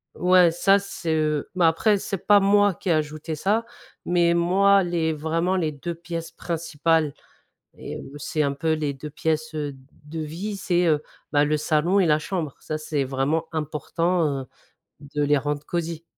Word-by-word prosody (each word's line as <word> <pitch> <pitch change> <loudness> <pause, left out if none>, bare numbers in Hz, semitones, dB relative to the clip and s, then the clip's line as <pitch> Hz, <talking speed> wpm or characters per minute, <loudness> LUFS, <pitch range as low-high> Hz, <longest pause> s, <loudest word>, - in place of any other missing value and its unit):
Ouais 180 -1 +5
ça 195 +4 +4
c'est, 200 -5 -3
heu, 155 -2 0
mais 180 - +2
après 165 +6 +4
c'est 195 -1 -5
pas 205 -1 +7
moi 205 0 +4
qui 180 - -5
ai - - +4
ajouté 155 0 -1
ça 210 +8 0 0.4
mais 175 -1 +3
moi 195 +3 +4
les 165 -2 0
vraiment 165 +4 0
les 160 -4 0
2 170 +4 -5
pièces 170 -1 -6
principales 160 -2 0 0.6
et - - -7
heu, 135 - -10
c'est 150 +1 -2
un 140 -1 0
peu 160 +3 0
les 150 -2 -1
2 150 +3 -8
pièces, 155 +1 -2
heu, 145 -2 -3 0.3
de 160 +2 -6
vie, 175 +7 -4
c'est, 180 -2 +1
heu, 155 -2 +2 0.3
bah, 145 -1 +4
le 155 +1 +1
salon 160 +6 +2
et 185 - +3
la 150 -1 +4
chambre, 155 -4 -3
ça 155 - -4
c'est 150 -2 -2
vraiment 135 +4 -1
important, 160 +3 0 0.2
heu, 130 - -12 0.7
de 150 - +1
les 145 0 +3
rendre 145 +1 -3
cosy. 170 -1 -3
160 Hz, 180 wpm, -24 LUFS, 150-175 Hz, 0.7 s, pas